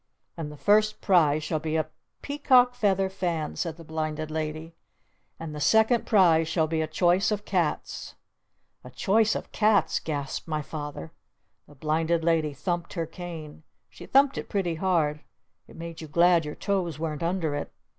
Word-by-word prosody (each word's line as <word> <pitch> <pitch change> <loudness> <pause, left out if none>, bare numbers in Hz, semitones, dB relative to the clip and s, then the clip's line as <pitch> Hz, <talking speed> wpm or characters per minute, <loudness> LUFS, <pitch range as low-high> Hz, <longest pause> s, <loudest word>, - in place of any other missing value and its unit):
And 155 -3 -5
the 150 - -11
first 215 +5 +3
prize 155 -6 +3
shall 155 +1 -1
be 155 +1 -3
a 155 -1 0 0.4
Peacock 260 -4 +4
Feather 195 -5 +1
Fan!" 175 -5 -3
said 165 -2 -3
the 165 - -11
Blinded 155 -1 -4
Lady. 155 +1 -4 0.7
"And 165 -2 -6
the 150 - -6
second 220 - +3
prize 170 -7 +4
shall 160 0 +1
be 160 0 -1
a 155 - -1
Choice 175 +4 +2
of 210 -1 -2
Cats!" - - -2 0.7
"A - - -10
Choice 220 +2 +2
of - - -6
Cats?" 210 -2 +2
gasped 145 -2 -4
my 155 -2 -2
Father. 145 - -7 0.6
The 145 - -17
Blinded 160 +3 0
Lady 160 -2 +2
thumped 175 +4 -3
her 165 -3 -2
cane. 165 -2 -9 0.3
She 100 - -12
thumped 275 0 +4
it - - -8
pretty 190 -5 -1
hard. 160 -4 0 0.5
It - - -15
made 165 0 -8
you 160 - -7
glad 170 +1 +4
your 150 - -6
toes 185 -6 -1
weren't 155 -2 -4
under 170 -3 -1
it. 145 - -4
165 Hz, 170 wpm, -26 LUFS, 155-190 Hz, 0.7 s, Peacock